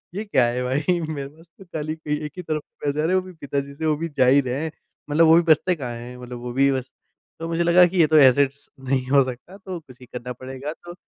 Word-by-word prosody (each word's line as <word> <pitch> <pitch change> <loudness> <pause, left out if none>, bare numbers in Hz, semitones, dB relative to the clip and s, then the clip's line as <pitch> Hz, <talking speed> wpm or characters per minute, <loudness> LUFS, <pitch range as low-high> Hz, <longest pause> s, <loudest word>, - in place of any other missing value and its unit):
ये 205 - -2
क्या 135 - +3
है 120 +1 -1
भाई? 145 +8 0
मेरे 140 -3 -4
पास 160 +3 -20
तो 195 - -14
खाली 155 -2 -4
एक 150 0 -2
ही - - -4
तरफ़ 155 -3 -3
से - - -13
पैसे 145 +1 0
आ 155 - 0
रहे 185 - +2
हैं 185 - +3
वो - - -14
भी 185 - -10
पिताजी 140 -3 -4
से 160 +2 -4
वो 155 -1 +2
भी 165 +2 -4
जा 130 - +5
ही 135 +3 +5
रहे 130 +3 -3
हैं। 160 - -3 0.4
मतलब 155 +3 +4
वो 160 - +7
भी 170 - +6
बचते 170 +2 +3
कहाँ 130 -6 -5
हैं? 120 +1 -9
मतलब 125 -1 -8
वो 120 0 -6
भी 140 +2 +3
बस 130 -1 -3 0.5
तो 165 - -4
मुझे 165 +1 0
लगा 175 +1 +6
कि 185 - -5
ये 160 - +6
तो 155 +1 +4
एसेट्स 140 0 +4 0.2
नहीं 130 -1 +1
हो 140 -1 +6
सकता 130 +9 -8
तो 190 -3 -7
कुसी 130 -4 -16
करना 125 0 -7
पड़ेगा। 130 +3 -7
तो 175 - -8
145 Hz, 275 wpm, -23 LUFS, 130-165 Hz, 0.5 s, वो